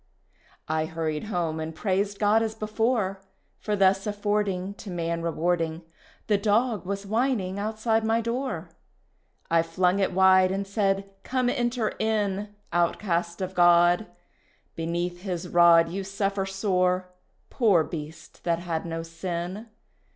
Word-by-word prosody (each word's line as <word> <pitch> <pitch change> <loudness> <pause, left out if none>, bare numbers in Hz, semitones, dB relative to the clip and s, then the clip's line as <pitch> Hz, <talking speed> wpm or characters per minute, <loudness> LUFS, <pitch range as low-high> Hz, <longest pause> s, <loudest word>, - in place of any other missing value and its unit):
I 155 0 0
hurried 160 +1 -3
home 170 -6 -2
and 160 0 -5
praised 200 +2 -1
God 210 +2 +3
as 220 -1 -2
before 215 -2 -1 0.4
For 210 - -1
thus 195 0 +3
affording 205 -2 -1
To 205 - -8
man 170 -1 -2
rewarding, 165 0 -1 0.4
The 205 -2 +2
dog 215 -2 +1
was 200 0 -3
whining 215 -3 0
outside 220 +1 0
my 225 +1 +2
door. 230 -7 -3 0.8
I 165 0 +5
flung 180 +3 +1
it 195 - +1
wide, 185 0 +5
and 195 +1 -2
said, 195 -1 -1
Come 255 -1 0
enter 240 -3 0
in, 210 -2 0 0.2
Outcast 170 0 0
of 185 0 -3
God. 175 +2 +5 0.7
Beneath 175 +2 -3
His 180 -2 -4
rod 170 -1 +6
You 195 +3 -4
suffer 195 0 -2
sore, 185 -2 0 0.4
poor 205 - +4
beast, 155 0 -9
that 170 -1 +1
had 170 -1 -3
no 165 0 -4
sin. 175 +5 -5
190 Hz, 135 wpm, -26 LUFS, 170-210 Hz, 0.8 s, rod